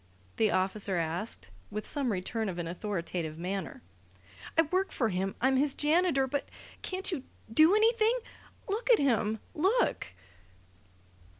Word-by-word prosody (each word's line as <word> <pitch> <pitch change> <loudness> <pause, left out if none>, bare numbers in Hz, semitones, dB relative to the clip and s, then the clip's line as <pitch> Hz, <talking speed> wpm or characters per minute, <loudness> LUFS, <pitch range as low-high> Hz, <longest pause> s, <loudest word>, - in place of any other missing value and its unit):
the 220 - +3
officer 190 0 +2
asked, 165 - -3 0.2
with 210 - -5
some 275 -5 0
return 210 +3 -2
of 180 - -5
an 175 - -3
authoritative 170 -3 -4
manner. 185 - -4 0.7
"I 325 - +7
work 370 +5 0
for 230 -4 0
him. 190 0 -2
I'm 265 +1 +3
his 280 +1 +2
janitor. 305 -2 +3
But 275 +2 -3 0.3
can't 380 +1 -2
you 300 -8 -3 0.3
do 315 - +6
anything? 450 +2 +3 0.5
Look 440 +5 -2
at 475 - +7
him! 220 -5 +1 0.2
Look!" 390 +10 +1
240 Hz, 135 wpm, -30 LUFS, -, 0.7 s, I